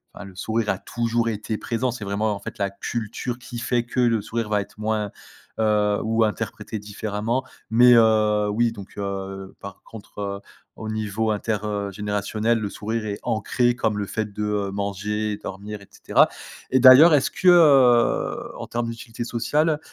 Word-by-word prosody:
enfin 100 - -9
le 95 - -12
sourire 110 +3 -2
a 95 - -4
toujours 115 0 -1
été 110 0 -3
présent. 120 +2 -1
C'est 115 -2 -7
vraiment 105 +2 -1
en - - -7
fait 120 - -8
la 100 -2 0
culture 115 +4 -4
qui 120 -1 -8
fait 120 0 0
que 125 - -4
le 115 -3 +2
sourire 115 0 -3
va 105 -1 +2
être 100 - -8
moins, 105 -1 -1 0.5
heu 105 -1 +2
ou 115 +1 +2
interprété 110 0 -4
différemment 105 +4 -3 0.3
mais 120 +3 +6
heu, 110 -2 +4
oui, 115 +3 +1
donc 100 -2 -12
heu, 95 -1 -5
par 100 -1 -9
contre, 110 -2 -12
heu, 100 -1 -3 0.4
au 110 - -7
niveau 110 0 -2
inter, 105 +1 -1
heu, 100 -1 -3
générationnel, 105 +3 -1
le 105 -2 -3
sourire 110 +2 -4
est 100 -1 -4
ancré 120 +2 +1
comme 110 -3 -1
le 100 - -2
fait 110 0 -3
de, 105 - -5
heu, 105 -2 -1
manger, 100 +1 -2
dormir, 100 +2 -7
et 100 - -15
cetera - - +3 0.4
et 130 - +4
d'ailleurs, 130 +6 +9
est 145 - +6
ce - - -1
que, 185 - -2
heu, 135 -9 +4
en - - -6
termes 120 0 -2
d'utilité 115 0 -6
sociale, 150 +7 0
110 Hz, 185 wpm, -23 LUFS, 105-115 Hz, 0.5 s, d'ailleurs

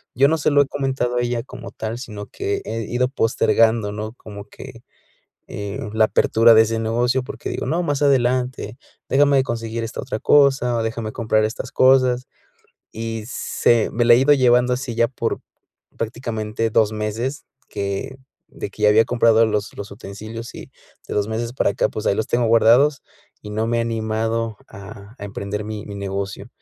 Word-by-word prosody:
yo 135 +3 +5
no 160 +2 +1
se 150 - +1
lo 145 - +5
he 140 - +1
comentado 135 -3 -2
a - - +2
ella 120 -1 -1
como - - -10
tal, 110 +1 -5
sino 105 -6 -8
que 400 0 -3
he 115 0 -3
ido 120 +4 0
postergando, 115 -3 +2
¿no?, 110 +1 -5
como 105 -4 -11
que, - - -12 0.6
eh, 100 0 -6
la 110 0 +4
apertura 115 +1 +4
de 110 - +7
ese 115 0 -2
negocio, 120 +3 0
porque - - -7
digo: - - -4
"No, 170 +3 0
más 145 -3 -1
adelante, 125 -2 +1 0.3
déjame 140 +1 +4
de 130 - +3
conseguir 115 -1 -4
esta 115 - -5
otra 110 - -4
cosa, 135 -4 +4
o 115 - 0
déjame 115 -1 -3
comprar 110 -2 +1
estas 110 - -5
cosas", 130 -1 +4 0.7
y 115 -1 -5
se 120 -2 +1
me 120 +1 +1
la 120 - +7
he - - +5
ido 135 +3 +5
llevando 125 -1 +3
así 125 -1 -5
ya 115 0 +2
por 115 -2 -3 0.6
prácticamente 115 -1 -3
2 110 0 +2
meses 110 +7 -3 0.2
que 100 +6 -4 0.3
de - - -7
que - - -10
ya - - +7
había 110 +2 +5
comprado 115 -2 +4
los 105 -1 -2
los 100 - -7
utensilios 110 +3 -9
y - - -10 0.4
de - - -4
2 105 0 0
meses 115 +1 -3
para 125 - +1
acá, 100 - 0
pues, 110 - -5
ahí - - +3
los 110 - -1
tengo 120 0 +1
guardados, 120 +5 +4 0.4
y 105 - -8
no 110 +1 -1
me 115 +1 0
he - - +2
animado 115 -1 -2
a 100 +2 -12
a - - -7
emprender 100 +1 -5
mi 105 -1 -6
mi 100 - -7
negocio, 100 +2 -5
115 Hz, 190 wpm, -21 LUFS, 110-125 Hz, 0.7 s, de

